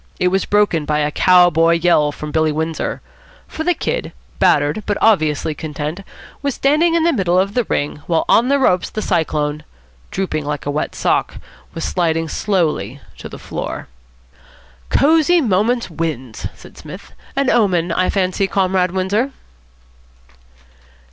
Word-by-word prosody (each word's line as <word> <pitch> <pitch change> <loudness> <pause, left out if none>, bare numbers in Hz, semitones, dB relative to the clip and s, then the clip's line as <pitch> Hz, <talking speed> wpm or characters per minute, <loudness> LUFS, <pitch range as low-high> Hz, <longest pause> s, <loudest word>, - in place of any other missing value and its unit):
It 180 - +3
was 190 +1 0
broken 205 -6 +2
by 150 0 -1
a 150 0 0
cow 180 +2 +5
boy 165 +1 +3
yell 165 -3 +3
from 150 +1 -7
Billy 160 0 +1
Windsor. 160 +1 -3 0.5
For 315 - -5
the 355 +1 +1
Kid, - - -3 0.3
battered, 145 +8 +2
but 205 - 0
obviously 155 -8 +2
content, 150 +2 -5 0.4
was 280 -2 -2
standing 310 +5 +2
in 335 - +2
the 335 0 +3
middle 180 -7 +1
of 195 +2 +1
the 245 -1 0
ring, 145 -4 -2
while 165 -2 +1
on 235 - +4
the 280 +1 +3
ropes 185 -10 +2
the 215 - -4
Cyclone, 150 -4 -1 0.5
drooping 180 -5 -2
like 145 0 -4
a 145 - -1
wet 150 - -3
sock, - - 0 0.4
was 165 - -4
sliding 165 -2 0
slowly 155 - -1 0.2
to - - -8
the - - -9
floor. - - -6 1.0
"Cosy 320 +4 +4
Moments 235 - +1
wins," 150 -8 -4
said - - -15
Psmith. - - -11 0.2
"An 275 -1 +2
omen, 180 -7 +2
I 185 +2 +1
fancy, 190 0 0
Comrade 185 -2 +1
Windsor." 195 +8 -1
180 Hz, 155 wpm, -18 LUFS, 155-215 Hz, 1.0 s, cow